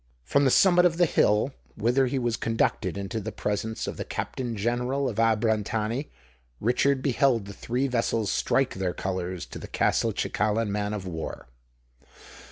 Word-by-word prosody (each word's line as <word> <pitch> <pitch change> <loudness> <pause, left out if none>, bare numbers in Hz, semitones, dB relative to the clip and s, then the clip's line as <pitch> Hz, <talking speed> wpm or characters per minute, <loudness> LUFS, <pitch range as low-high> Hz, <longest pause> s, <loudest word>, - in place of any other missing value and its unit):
From 140 - +2
the - - +5
summit 180 +5 +5
of 165 -2 +2
the 175 - +5
hill, 110 -3 +2 0.2
whither 125 +5 +2
he 135 - -1
was 120 -3 0
conducted 115 -5 0
into 100 +3 -3
the 110 +1 -5
presence 105 +2 -2
of - - -5
the - - -3
Captain 120 -3 -4
General 125 +5 0
of 115 -4 -4
Abrantani, 110 +3 +1 0.5
Richard 130 +3 +2
beheld 130 -5 +2
the 100 - -8
three 125 +7 -1
vessels 115 -4 0
strike 135 -1 +1
their 95 -2 -2
colours 90 -2 -3
to - - -9
the - - -8
Castelcicalan 105 0 0
man 105 +1 -1
of 100 -3 -6
war. 80 -3 -5
115 Hz, 160 wpm, -26 LUFS, 105-130 Hz, 0.5 s, the